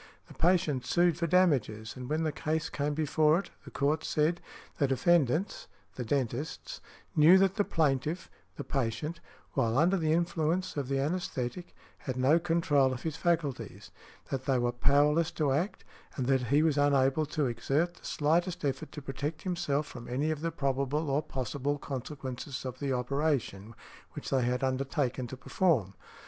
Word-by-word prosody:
The - - -13
patient 160 -7 +2
sued 175 +5 +3
for 170 +1 -1
damages, 135 -12 +2
and 125 -1 -7
when 155 +2 0
the 155 - 0
case 160 +2 -2
came 145 0 -1
before 155 +1 +3
it, 195 - -5
the - - -9
Court 150 +3 0
said, 155 +3 +1 0.4
"The 140 - +3
defendants 155 - +1 0.3
(the 125 - -4
dentists) 140 - -3 0.3
knew 165 +4 +8
that 195 0 +3
the 205 - +1
plaintiff 155 0 0 0.3
(the - - -5
patient) 150 +5 -2 0.3
while 120 -3 +1
under 175 +6 +4
the 160 -3 +1
influence 170 +1 0
of 140 -3 -2
the 135 - -1
anæsthetic, 145 0 -2 0.3
had 130 -2 -4
no 135 +6 +4
control 165 -6 +2
of 125 - -7
his 160 -2 -2
faculties, 165 -5 -2 0.4
that 130 -1 -3
they 135 -2 +2
were 120 0 +1
powerless 145 +6 +3
to 145 -3 +1
act, 165 +9 -1 0.3
and 130 - -2
that 130 -1 +2
he 145 +5 +4
was 155 -3 +2
unable 140 +1 +3
to 150 -1 -1
exert 135 +8 0
the - - -21
slightest 170 +3 0
effort 140 +3 -2
to 150 - -7
protect 145 +3 -4
himself 155 -5 -1
from 120 -3 -10
any 140 +6 0
of 155 -1 -3
the 165 - 0
probable 140 0 -1
or 140 +2 +2
possible 140 0 -3
consequences 135 -1 -6
of 130 0 -5
the 140 -2 -2
operation 125 -5 -1 0.4
which - - -7
they 135 - +3
had 125 +1 0
undertaken 130 -1 -1
to 130 - -8
perform. 130 - +1
145 Hz, 170 wpm, -30 LUFS, 130-160 Hz, 0.4 s, knew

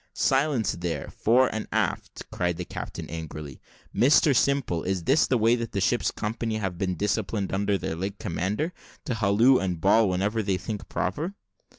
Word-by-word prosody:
"Silence 135 -5 +2
there, 85 -1 -4
fore 125 +4 +3
and 110 0 -4
aft," - - -2
cried 90 -2 -1
the 90 - -4
captain 80 -2 -6
angrily. 75 -3 -7 0.3
"Mr 140 +2 +5
Simple, 130 -11 +1
is 95 -1 -2
this 135 - +3
the 130 - +2
way 115 +1 +4
that 115 -2 -5
the 100 - 0
ship's 120 +5 +1
company 110 +1 -3
have 95 -4 -3
been 95 -2 -1
disciplined 100 +1 -1
under 100 +1 +1
their 80 -2 -4
late 95 +4 -4
commander, 105 - -2 0.3
to - - -1
halloo 115 +4 +4
and 90 -3 -2
bawl 100 +4 +4
whenever 100 +5 0
they 95 -3 0
think 100 +3 -6
proper?" 160 - -2
100 Hz, 175 wpm, -26 LUFS, 90-115 Hz, 0.3 s, Mr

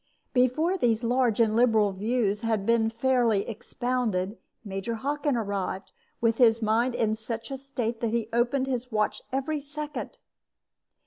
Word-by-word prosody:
Before 310 +9 +2
these 235 -3 +2
large 240 -2 +2
and 220 -2 +3
liberal 225 -4 +4
views 210 +1 0
had 220 -4 0 0.3
fairly 235 -3 +2
been - - -15
expounded, 230 -4 -2 0.3
Major 195 +3 -3
Hockin 285 +2 -1
arrived, 200 -3 -3 0.3
with 230 -1 +2
his 230 -2 +6
mind 230 +3 +1
in 215 -1 +1
such 225 +2 -5
a - - -2
state 245 -4 -3
that 230 - 0
he 230 -1 -1
opened 245 +3 +2
his 250 -1 -3
watch 215 -1 0
every 275 +3 -1
second. 300 - -6
235 Hz, 145 wpm, -27 LUFS, 220-255 Hz, 0.3 s, his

